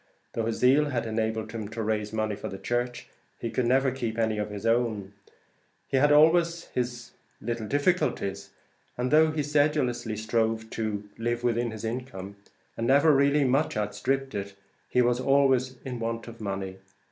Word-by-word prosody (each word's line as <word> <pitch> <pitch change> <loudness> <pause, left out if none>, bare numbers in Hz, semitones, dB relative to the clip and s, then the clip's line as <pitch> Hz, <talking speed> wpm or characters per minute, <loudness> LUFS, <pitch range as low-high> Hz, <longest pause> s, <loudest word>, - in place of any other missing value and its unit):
Though 115 -1 -1
his 115 - -1
zeal 135 +4 +5
had 125 -5 -2
enabled 110 0 -2
him 110 -2 -5
to 110 +1 -4
raise 105 -1 -1
money 110 -1 -1
for - - -6
the 95 - -6
church, 120 +3 -2 0.3
he 115 - -3
could 125 -2 0
never 130 +2 +3
keep 120 -3 -3
any 110 -2 +1
of 105 - -2
his 105 +1 -6
own; 115 -4 0 0.7
he 135 - +1
had 145 +2 +4
always 165 +3 +5
his 125 -1 -3 0.3
little 115 -1 -3
difficulties, 145 - 0 0.5
and 125 +1 -1
though 155 +1 +6
he 155 -1 -1
sedulously 145 -6 +1
strove 110 0 -1
to 105 -2 -3
live 120 +1 -1
within 120 0 +1
his 110 0 -6
income, 110 -5 -5 0.4
and 115 - -2
never 145 +4 +5
really 140 +1 +4
much 135 0 +1
outstripped 135 +5 -1
it, 100 0 -5 0.3
he 125 - +3
was 120 0 +2
always 130 -1 +3
in 125 -2 -4
want 115 0 -3
of 115 -1 -10
money. 95 -2 -4
120 Hz, 170 wpm, -27 LUFS, 110-135 Hz, 0.7 s, though